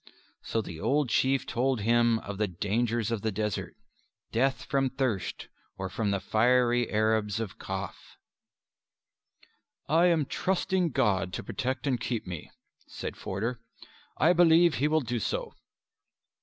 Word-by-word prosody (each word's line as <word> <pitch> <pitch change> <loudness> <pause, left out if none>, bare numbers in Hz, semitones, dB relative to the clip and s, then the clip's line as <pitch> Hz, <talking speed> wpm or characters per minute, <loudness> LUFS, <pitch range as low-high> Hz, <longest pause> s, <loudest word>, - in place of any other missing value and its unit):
So 115 - -2
the 85 -4 -8
old 140 - +1
Chief 135 +3 +2
told 125 -1 0
him 115 +1 +3
of 100 0 -7
the 105 - +2
dangers 115 +5 -1
of 115 -3 -1
the 110 - -1
desert; 105 0 -3 0.6
death 130 +1 +1
from 135 -1 +1
thirst 130 -7 -2 0.3
or 95 0 -4
from 105 +1 -1
the 100 0 0
fiery 120 +2 +2
Arabs 110 -1 +1
of 110 -4 -5
Kaf. - - -6 1.7
"I 165 +4 +4
am 165 -4 +3
trusting 185 +2 0
God 95 - +1
to - - -4
protect 130 +3 -3
and 130 -4 +1
keep 120 -3 -2
me," 90 -4 -7 0.4
said - - -6
Forder. 115 +6 -3 0.6
"I 165 +4 +5
believe 170 -1 +5
He 130 +5 +1
will 155 +1 +2
do 120 -2 -2
so." - - -3
120 Hz, 140 wpm, -28 LUFS, 105-135 Hz, 1.7 s, I